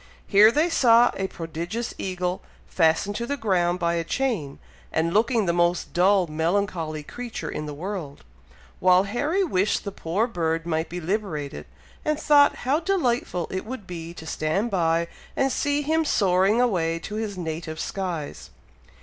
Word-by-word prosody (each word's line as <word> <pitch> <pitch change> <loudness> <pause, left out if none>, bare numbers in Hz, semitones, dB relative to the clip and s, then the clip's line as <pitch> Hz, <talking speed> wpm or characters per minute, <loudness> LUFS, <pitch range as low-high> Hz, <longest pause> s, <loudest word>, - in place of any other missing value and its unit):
Here 210 +2 +6
they 305 +6 +2
saw 240 -7 +5
a 190 - -2
prodigious 170 +8 -5
eagle, 180 -1 -2 0.3
fastened 165 +4 +2
to 235 - -3
the 285 - -2
ground 180 -6 +1
by 170 -2 0
a 170 -1 0
chain, 170 - -2 0.3
and 165 +1 0
looking 225 +1 +2
the 170 - +1
most 175 0 +1
dull, 190 +1 +4
melancholy 165 -1 -1
creature 240 +8 -6
in 150 - -4
the 150 - -5
world; 170 -3 -6 0.6
while 185 0 +5
Harry 290 - 0
wished 200 - +1
the 200 - -4
poor 190 +4 -1
bird 165 -7 -2
might 160 -1 -1
be 180 - -5
liberated, 170 -6 -3 0.4
and 305 0 0
thought 290 -1 +5
how 280 +4 +2
delightful 250 - 0
it 185 - -3
would 225 -2 -7
be 170 -2 -7
to 160 - -9
stand 160 +9 -1
by 170 -2 +1 0.3
and 270 0 +2
see 290 +3 0
him 320 +2 +1
soaring 195 - +3
away 175 -9 +1
to 185 +5 -8
his 215 -3 -3
native 160 -2 -5
skies. 175 -7 -4
185 Hz, 160 wpm, -25 LUFS, 165-235 Hz, 0.6 s, Here